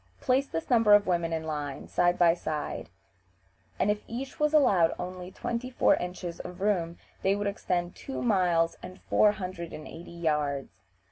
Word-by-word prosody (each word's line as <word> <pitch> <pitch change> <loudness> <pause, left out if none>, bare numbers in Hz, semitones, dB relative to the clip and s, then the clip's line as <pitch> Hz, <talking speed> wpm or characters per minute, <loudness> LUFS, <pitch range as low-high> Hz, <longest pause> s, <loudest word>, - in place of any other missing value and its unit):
Place 265 +1 +2
this 165 -6 -4
number 225 -3 +7
of 205 - +4
women 170 -2 0
in 160 -1 -2
line, 150 -3 -4
side 175 0 +2
by 170 -1 +5
side, 155 -3 -4 0.9
and 205 - +2
if 210 0 -2
each 260 +3 -6
was 300 0 +3
allowed 195 - +4
only 180 0 -6
twenty 235 +6 -4
four 255 - +4
inches 180 -1 -5
of 180 +1 -8
room, 180 -4 0 0.2
they 195 +1 +2
would 205 0 -2
extend 180 -3 -2
two 270 - -5
miles 180 -7 +2
and 180 0 -10
four 210 -1 +3
hundred 185 -4 -6
and 155 - -8
eighty 165 +2 -10
yards. 150 - -2
180 Hz, 175 wpm, -28 LUFS, 165-205 Hz, 0.9 s, number